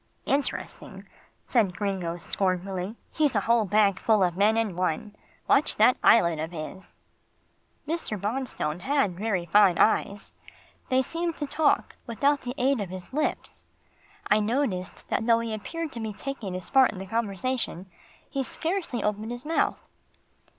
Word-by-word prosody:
"Interesting," 280 0 -3 0.4
said 205 -7 +1
Gringo 190 -5 -2
scornfully, 185 +2 -2 0.2
"he's 295 -5 +1
a 205 - +3
whole 230 +1 +3
bag 200 -1 +3
full 215 -3 +3
of 175 -2 +1
men 210 +4 +3
in 220 -5 0
one. 180 +3 -2 0.3
Watch 285 - +3
that 225 +4 +5
eyelid 170 -8 +5
of 160 +1 -3
his." 170 +3 -8 0.9
Mr. 310 -10 -2
Bonstone 205 - -3
had 265 -3 +1
very 195 -2 -1
fine 190 0 +5
eyes. 205 -2 +1 0.6
They 260 0 +3
seemed 335 +3 -3
to 295 - -2
talk 310 +2 +1
without 275 +5 +1
the 250 +1 -5
aid 260 -1 +2
of 195 - -4
his 185 +4 -9
lips. 305 +2 -2 0.6
I 210 - +3
noticed 215 -5 -2
that 225 - -1
though 230 -1 +6
he 230 -1 -3
appeared 320 +9 -5
to 235 - -6
be 220 -2 -4
taking 220 -6 -5
his 185 - -7
part 265 -2 +5
in - - -10
the 190 - -6
conversation, 225 -1 -2 0.4
he 275 - -2
scarcely 325 - -2
opened 210 +1 -1
his 245 +2 -6
mouth. 325 +2 0
215 Hz, 155 wpm, -27 LUFS, 190-260 Hz, 0.9 s, though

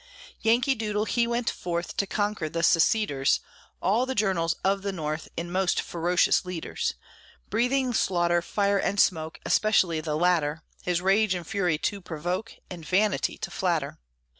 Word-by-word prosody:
Yankee 240 +4 +3
Doodle, 215 -3 -2
he 235 +1 +1
went 235 0 -1
forth 170 -1 -3
To 200 - +1
conquer 205 -6 -1
the 165 +2 -3
seceders, 165 -5 +3 0.4
All 225 +7 +2
the 265 - -2
journals 185 -6 +1
of 195 +1 +1
the 200 0 -2
North, 155 -3 -4
In 175 +1 -4
most 185 0 +1
ferocious 175 +2 +2
leaders, 180 -3 -3 0.6
Breathing 250 +3 +1
slaughter, 175 -4 +2
fire, 200 +2 +1
and 200 - -1
smoke, 160 -5 +1
Especially 185 -7 +2
the 155 -1 -2
latter, 165 -2 +1 0.2
His 175 -1 -1
rage 195 +1 +3
and 175 -1 -5
fury 180 -5 0
to 200 +5 -2
provoke, 175 +6 -4
And 175 -3 -9
vanity 185 -3 +1
to - - -6
flatter. - - -1
185 Hz, 155 wpm, -26 LUFS, 170-210 Hz, 0.6 s, Yankee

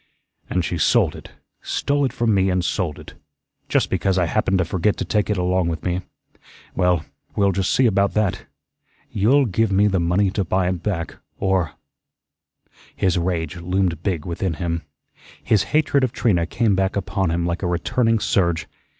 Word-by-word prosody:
"And 90 -3 0
she 85 - -3
sold - - +3
it - - -11 0.3
stole 145 0 0
it 130 - -1
from 115 -2 +1
me 95 -1 +2
and 90 -1 0
sold 85 -7 -1
it. - - -12 0.6
Just - - +1
because 95 -1 +1
I 90 - +3
happened 95 +2 +1
to 90 - +1
forget 95 +4 0
to - - -3
take 105 -1 0
it 105 - +1
along 90 0 +1
with 80 -2 -3
me. 90 0 -1 0.7
Well, 90 -3 +2 0.3
we'll 100 -1 +3
just 95 -1 -1
see 130 - +3
about 100 -3 +2
that. 105 -4 0 0.6
You'll 130 +8 +3
give 110 0 0
me 100 +2 +4
the 95 -3 +2
money 90 +3 +2
to 100 0 -1
buy 95 +1 0
it 90 -2 -2
back, 90 -5 -3 0.2
or 95 -5 0 0.6
" - - -65 0.5
His 95 -2 +1
rage 85 0 -2
loomed 90 -1 -1
big 85 -5 -2
within 85 0 -2
him. 85 0 -2 0.6
His 110 - +2
hatred 145 -3 +2
of 130 - +1
Trina 90 -10 +1
came 115 +2 +1
back 95 0 0
upon 95 -2 -1
him 85 +1 0
like 85 0 -2
a 90 - -1
returning 115 +7 +1
surge. 85 -6 0
95 Hz, 185 wpm, -22 LUFS, 85-105 Hz, 0.7 s, me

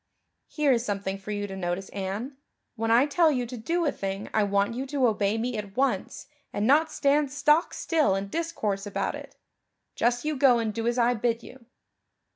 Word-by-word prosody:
"Here 300 -3 +1
is 235 -2 +2
something 195 -3 -3
for 200 - -11
you 205 -1 -2
to 195 -1 -7
notice, 185 +1 -3
Anne. 200 +8 -4 0.4
When 225 -1 -2
I 235 +4 +5
tell 315 +2 +3
you 250 -4 -1
to 245 +2 -7
do 335 +9 -1
a 290 - +2
thing 195 +1 -5
I 215 - +3
want 200 +1 +1
you 260 +3 -4
to 275 -2 +1
obey 210 -2 +1
me 240 +2 -2
at 200 0 -8
once 255 -8 -1 0.3
and 205 - -1
not 305 +5 +4
stand 285 -1 +2
stock 300 +3 +3
still 310 - +1
and 195 0 -4
discourse 215 -12 -2
about 205 - -2
it. - - -9 0.6
Just 240 +3 0
you 305 0 0
go 260 -3 +5
and 225 -2 -1
do 230 +2 -2
as 240 +1 0
I 240 0 +3
bid 230 0 -1
you." 245 -2 -14
235 Hz, 205 wpm, -27 LUFS, 205-275 Hz, 0.6 s, I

